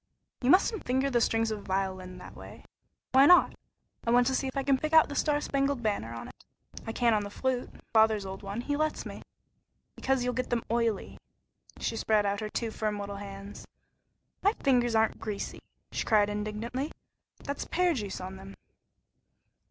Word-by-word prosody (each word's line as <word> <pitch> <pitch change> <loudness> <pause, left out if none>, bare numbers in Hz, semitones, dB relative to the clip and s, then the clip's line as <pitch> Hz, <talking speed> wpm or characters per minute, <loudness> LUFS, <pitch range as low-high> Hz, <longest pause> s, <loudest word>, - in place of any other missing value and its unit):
"You 250 - +1
musn't 390 +5 +4
finger 265 +2 +1
the 240 -2 +3
strings 225 0 +2
of 215 - -3
a - - -11
violin 190 -1 -3
that - - -11
way." - - -12 0.5
"Why 270 +2 +7
not? 360 0 +7 0.5
I - - -2
want 245 +1 +5
to 265 - +1
see 270 - 0
if 265 - -5
I 275 - +1
can 270 -1 +3
pick 310 +3 -3
out 320 -2 +7
'The 285 - -5
Star 295 0 +2
Spangled 275 -3 0
Banner' 160 - -1
on 115 - -7
it. - - -17 0.4
I - - -1
can 235 0 +2
on 210 -1 +1
the 205 - -5
flute, 255 +4 -2 0.2
father's 220 -2 +4
old 190 0 -6
one; 200 +3 -4
he 290 +4 -1
lets 310 +1 -1
me." - - -7 0.7
"Because 265 -1 0
you'll 250 0 0
get 255 0 -2
them 240 -2 0
oily." 230 -4 -1 0.6
She 230 - -2
spread 215 -2 +2
out 200 0 0
her 215 -1 -4
two 230 +1 -2
firm 215 -1 -2
little 200 0 -5
hands. 200 0 -9 0.7
"My 405 +2 +3
fingers 245 - +2
aren't 220 0 +2
greasy!" 210 -2 -5 0.3
she - - -2
cried 210 -2 +3
indignantly; 215 +7 -3 0.5
"that's 280 - -4
pear 360 0 +2
juice 205 -8 -4
on 185 +1 -7
them." 195 +1 -11
225 Hz, 190 wpm, -29 LUFS, 205-265 Hz, 0.7 s, Why